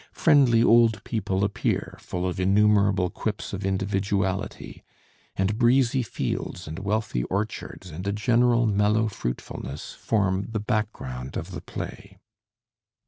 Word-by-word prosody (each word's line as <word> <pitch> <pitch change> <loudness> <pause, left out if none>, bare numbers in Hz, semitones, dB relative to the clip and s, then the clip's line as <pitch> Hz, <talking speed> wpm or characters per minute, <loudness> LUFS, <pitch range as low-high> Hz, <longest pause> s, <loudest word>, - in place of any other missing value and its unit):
Friendly 135 -8 +5
old 115 -3 +4
people 95 -4 -1
appear, 100 0 -1
full 90 0 -3
of 90 - -3
innumerable 100 -1 +3
quips 105 -2 -4
of 100 +1 -4
individuality, 95 +1 -2 0.5
and 100 +3 0
breezy 125 +1 +4
fields 95 -5 -4
and 80 +3 -6
wealthy 100 - -1
orchards 95 - -4
and 90 +6 -6
a - - +1
general 120 +3 +3
mellow 105 +1 +2
fruitfulness 70 - -5
form 95 -3 0
the 110 -1 -2
background 100 - -3
of - - -5
the - - -6
play. - - -8
100 Hz, 125 wpm, -25 LUFS, 95-110 Hz, 0.5 s, Friendly